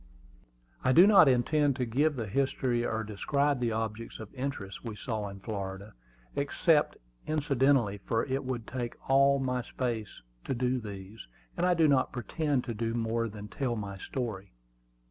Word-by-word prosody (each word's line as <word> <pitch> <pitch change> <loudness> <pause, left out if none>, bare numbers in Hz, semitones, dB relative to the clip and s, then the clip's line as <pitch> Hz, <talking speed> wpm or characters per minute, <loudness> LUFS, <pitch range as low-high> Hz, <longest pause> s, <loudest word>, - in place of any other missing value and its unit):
I 130 - +3
do 175 +7 +9
not 200 -7 +7
intend 140 +3 +3
to 125 -1 -1
give 145 +6 +1
the 115 -4 -3
history 125 +1 0
or 110 -2 -1
describe 140 +7 0
the 120 -2 0
objects 110 +1 -4
of 110 -2 -10
interest 125 -8 -5
we 115 -3 -5
saw 110 -2 -3
in 100 0 -9
Florida, 100 0 -5 0.4
except - - +2 0.3
incidentally, 135 -8 +2
for 115 +3 -1
it 135 0 -2
would 125 -3 -4
take 120 -1 -4 0.2
all 140 +1 +5
my 125 -2 -1
space 115 - -4 0.2
to 135 - -1
do 125 +1 0
these, 100 - -9 0.3
and 180 - +1
I 180 - +4
do 160 -2 +4
not 135 -3 +3
pretend 135 +3 -1
to 120 - -4
do 115 +1 -2
much 115 -1 -1
more 115 0 0
than 105 0 -8
tell 125 +2 -2
my 100 -3 -5
story. 105 - -5
120 Hz, 170 wpm, -30 LUFS, 110-135 Hz, 0.4 s, do